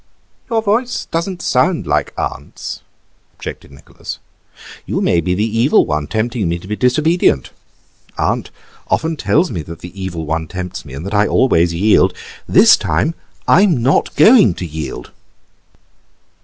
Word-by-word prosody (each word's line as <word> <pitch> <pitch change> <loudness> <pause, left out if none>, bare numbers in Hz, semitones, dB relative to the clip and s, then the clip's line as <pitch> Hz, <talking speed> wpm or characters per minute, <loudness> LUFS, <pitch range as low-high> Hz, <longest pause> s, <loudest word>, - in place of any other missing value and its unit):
"Your 225 -2 0
voice 235 +4 0
doesn't 175 +2 -3
sound 180 -1 +1
like - - 0
aunt's," 70 - -5 0.5
objected - - -9
Nicholas; 70 +1 -9 0.7
"you - - -1
may 85 - +2
be 90 +2 -1
the 105 +3 0
Evil 115 +5 +3
One 75 -1 -2
tempting 110 -3 -1
me 85 - -1
to 85 - -12
be 105 - -2
disobedient. 150 - +1 0.7
Aunt - - -1 0.4
often 160 +1 0
tells 160 +4 +1
me 90 -7 -3
that 85 +2 -10
the 90 +2 -10
Evil 85 -4 -4
One 80 +1 -2
tempts 90 +1 -6
me 65 -3 -9
and 75 +6 -7
that 100 - -5
I 105 0 +3
always 85 -10 +3
yield. 95 -1 +3 0.3
This - - +7
time 165 - 0 0.3
I'm 175 - +4
not 135 - +1
going 185 - +6
to 90 - -5
yield." 75 -6 -6
105 Hz, 150 wpm, -17 LUFS, -, 0.7 s, This